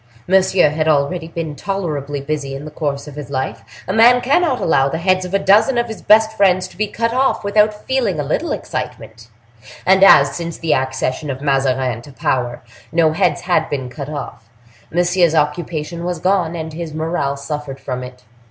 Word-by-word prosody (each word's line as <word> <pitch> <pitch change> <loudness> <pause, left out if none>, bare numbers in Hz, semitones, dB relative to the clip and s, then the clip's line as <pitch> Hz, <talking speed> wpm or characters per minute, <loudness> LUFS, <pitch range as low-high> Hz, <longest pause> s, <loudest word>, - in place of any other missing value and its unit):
Monsieur 185 -4 +4
had 155 +1 -1
already 155 +3 +1
been 165 -2 -5
tolerably 150 -7 -3
busy 140 -1 -4
in 140 +2 -7
the 155 - -8
course 145 -1 -3
of 150 - -9
his 145 -3 -8
life. 130 -4 -3 0.2
A 185 - -1
man 235 +3 +6
cannot 275 +2 +1
allow 135 -4 +2
the 160 - -2
heads 185 +2 +1
of 180 - -8
a - - +6
dozen 215 +6 +3
of 240 - +2
his 220 - -8
best 220 +1 +4
friends 185 -2 +3
to - - -17
be 215 +1 -1
cut 230 +3 -2
off 265 -1 +1
without 210 +1 +1
feeling 235 -11 0
a - - 0
little 140 - -2
excitement; 115 0 -6 0.6
and 190 +1 +5
as, 195 - +7
since 170 -1 -5
the 165 -2 0
accession 130 +2 -2
of 130 -1 -4
Mazarin 135 -4 0
to 140 - -13
power, 125 -2 -2 0.3
no 160 -1 +3
heads 160 -2 +1
had 175 -3 0
been 130 -3 -3
cut 140 +2 -7
off, 115 -6 -7 0.4
Monsieur's 175 -1 +2
occupation 155 +2 -2
was 175 0 -2
gone, 180 -1 0
and 160 -1 -5
his 160 -1 -6
morale 155 -3 -2
suffered 140 -1 -6
from 125 -2 -5
it. 125 0 -10
160 Hz, 190 wpm, -18 LUFS, 140-190 Hz, 0.6 s, as